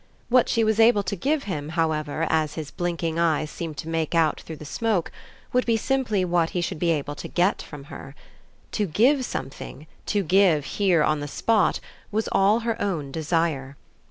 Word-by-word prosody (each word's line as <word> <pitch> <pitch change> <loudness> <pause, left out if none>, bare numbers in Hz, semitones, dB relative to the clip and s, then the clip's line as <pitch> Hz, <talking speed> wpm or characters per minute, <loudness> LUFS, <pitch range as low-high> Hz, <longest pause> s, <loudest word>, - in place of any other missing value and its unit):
What 250 0 +4
she 230 - +2
was 220 0 +1
able 225 -2 +5
to 200 - -3
give 280 - 0
him, 150 -6 -4
however, 155 -1 0
as 155 -2 +1
his 155 -3 -6
blinking 170 -2 -2
eyes 155 -2 +1
seemed 160 -3 -6
to 155 - -6
make 165 0 -1
out 160 -2 +2
through 160 - -8
the 150 - -11
smoke, 210 +2 -1 0.4
would 250 0 +3
be 230 -1 +3
simply 225 -6 0
what 170 -2 +1
he - - +2
should 170 - -3
be 175 - +1
able 145 -3 0
to - - -7
get 180 +3 +1
from 145 -3 -10
her. 140 0 -10 0.6
To 210 -2 0
give 255 - +3
something, 135 - -6 0.2
to 205 -1 +1
give 180 -4 +3
here 180 -5 +2
on 155 0 +1
the 145 - -4
spot, 215 +9 +1 0.3
was 215 +1 -1
all 200 +4 +3
her 230 -1 -2
own 160 -9 -2
desire. 155 -3 -1
170 Hz, 190 wpm, -24 LUFS, 155-210 Hz, 0.6 s, able